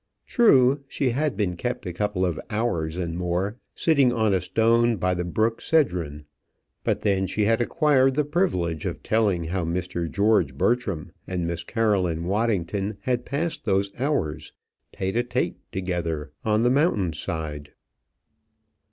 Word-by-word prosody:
True, 140 - +4
she 135 -2 0
had 140 -2 -1
been 95 -4 0
kept 120 +6 -3
a 90 - -4
couple 105 0 0
of 85 -4 -2
hours 90 -8 -1
and 85 -2 -3
more 90 +5 -1 0.2
sitting 140 -6 +3
on 110 -4 +1
a 95 - +2
stone 115 +4 +3
by 90 0 +1
the 90 0 -2
brook 110 +6 0
Cedron; 85 - 0 0.6
but - - 0
then 95 -2 +1
she 105 +2 0
had 115 +2 +2
acquired 135 -1 +3
the 150 0 +1
privilege 90 - 0
of - - -5
telling 105 -6 +1
how 90 +2 -2
Mr. 85 0 -2
George 105 +4 +2
Bertram 110 -10 0 0.2
and 90 -2 -2
Miss 85 0 -3
Caroline 95 -6 0
Waddington 100 0 -1
had 125 -1 -1
passed 160 +4 -2
those 100 -1 +1
hours, 125 - -1 0.4
tête 95 0 -3
à 120 - +1
tête - - -1
together, 85 -5 -3
on 110 +1 +2
the 120 - +4
mountain 125 - +2
side. 75 -2 -5
100 Hz, 150 wpm, -25 LUFS, 85-120 Hz, 0.6 s, True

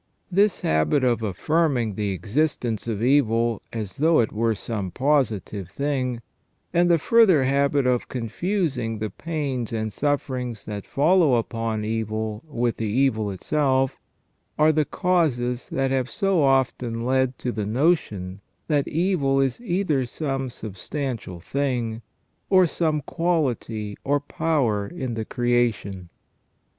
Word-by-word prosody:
This 200 +2 +3
habit 80 - +2
of 120 -2 +2
affirming 120 - 0
the 105 +1 -2
existence 115 - -1
of 110 -1 -2
evil 120 -4 +2
as 105 -5 -5
though 160 +2 +4
it 110 - +1
were 115 +1 +1
some 100 -2 -4
positive 110 - 0
thing, 130 -3 -2 0.5
and 175 0 +3
the 170 - +5
further 190 -5 +5
habit 140 +1 +2
of 125 -1 +1
confusing 130 - -2
the 105 -1 -3
pains 140 -5 -3
and 110 -2 -2
sufferings 130 -5 -2
that 105 -2 -6
follow 155 -1 +4
upon 115 -2 -2
evil 110 0 -3
with 120 -5 -1
the 110 - -2
evil 110 -2 +1
itself, 135 +6 0 0.6
are 155 +1 +5
the 155 -1 +1
causes 130 -11 0
that 135 0 0
have 130 -1 0
so 195 -4 +1
often 130 -4 +1
led 130 0 +1
to 125 - -3
the 105 -3 -3
notion 105 - 0 0.3
that 145 -3 +1
evil 160 -5 +1
is 135 - 0
either 175 - 0
some 135 -1 -3
substantial 115 - -5
thing, 120 +2 -2 0.5
or 185 -1 +6
some 155 -2 0
quality 130 -11 -1
or 145 +1 +2
power 135 -9 0
in 130 -8 -4
the 110 -1 -3
creation. 120 -7 0
125 Hz, 130 wpm, -24 LUFS, 110-150 Hz, 0.6 s, or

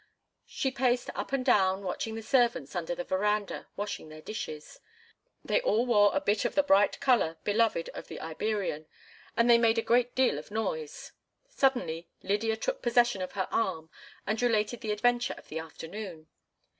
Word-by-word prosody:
She 265 - -2
paced 250 -1 0
up - - -5
and 270 -2 -1
down 195 -5 +3
watching 220 +4 -3
the 225 - -6
servants 240 -4 +1
under 175 0 -2
the 175 - -4
veranda 205 +3 -1
washing 205 -5 -5
their 155 0 -10
dishes. 155 -8 -7 0.7
They - - +2
all 240 - +2
wore 205 -4 +5
a - - +3
bit 205 +2 +1
of 240 - -2
the 290 - +4
bright 205 -7 +3
color 235 -11 +2
beloved 210 -4 +1
of - - -9
the - - -8
Iberian, 165 -2 -3 0.5
and 235 - +4
they 235 -1 +7
made 230 -1 +3
a 230 - +1
great 245 +1 +2
deal 255 - +2
of 150 - -12
noise. 190 -8 -4 0.4
Suddenly 245 - 0
Lydia 220 +3 0
took - - -2
possession 240 -4 +3
of 185 - -5
her 190 -2 -1
arm 160 -7 -1 0.3
and 215 +3 -1
related 230 -1 +1
the 220 -2 -2
adventure 240 +3 +1
of - - -15
the 160 - -4
afternoon. 165 +1 -8
215 Hz, 175 wpm, -29 LUFS, 185-240 Hz, 0.7 s, they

